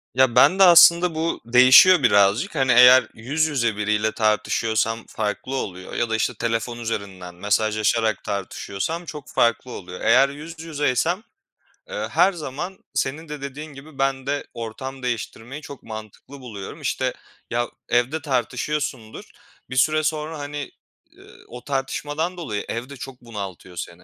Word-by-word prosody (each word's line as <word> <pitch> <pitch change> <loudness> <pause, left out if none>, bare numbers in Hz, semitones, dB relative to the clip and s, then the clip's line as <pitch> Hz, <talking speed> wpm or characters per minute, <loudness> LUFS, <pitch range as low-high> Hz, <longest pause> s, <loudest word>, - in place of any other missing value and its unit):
Ya, 130 -2 +3
bende 190 +1 +6
aslında 170 -1 +7
bu 165 +1 -2
değişiyor 130 +8 +7
birazcık. 105 - +3
Hani, 135 -3 +2
eğer 125 0 +7
yüz 140 +8 -1
yüze 120 -8 0
biriyle 105 +1 0
tartışıyorsam 110 +1 0
farklı 105 +6 -4
oluyor 95 -7 -5
ya 120 - -1
da, 110 - 0
işte, 110 +2 0
telefon 115 +1 -2
üzerinden 95 -6 -5
mesajlaşarak 110 +2 0
tartışıyorsam 100 - -4
çok 150 -3 -9
farklı 120 +2 +1
oluyor. 90 -4 -9
Eğer 135 +1 +5
yüz 155 +3 -10
yüzeysem, 160 - -1 0.7
eee, - - -4
her 195 - +4
zaman 170 +3 -6
senin 155 +4 -2
de 150 -2 -7
dediğin 145 +2 -7
gibi 140 +1 -13
ben 135 -1 0
de 145 0 -2
ortam 130 +4 -7
değiştirmeyi 120 +3 -5
çok 140 -2 -11
mantıklı 110 +5 -10
buluyorum. 105 -7 -9
İşte, - - -1 0.4
ya, 120 0 -1 0.2
evde 120 +6 +1
tartışıyorsundur, 130 -2 -3 0.4
bir 130 - -6
süre 155 +4 +3
sonra, 155 0 -2
hani, 145 0 -6 0.4
eee, - - -19 0.2
o 125 0 -10
tartışmadan 145 +5 -3
dolayı 120 -12 -4
ev 120 +3 -4
de 140 - -10
çok 125 +1 -9
bunaltıyor 100 -6 -8
seni. 85 +1 -7
130 Hz, 145 wpm, -22 LUFS, 110-150 Hz, 0.7 s, aslında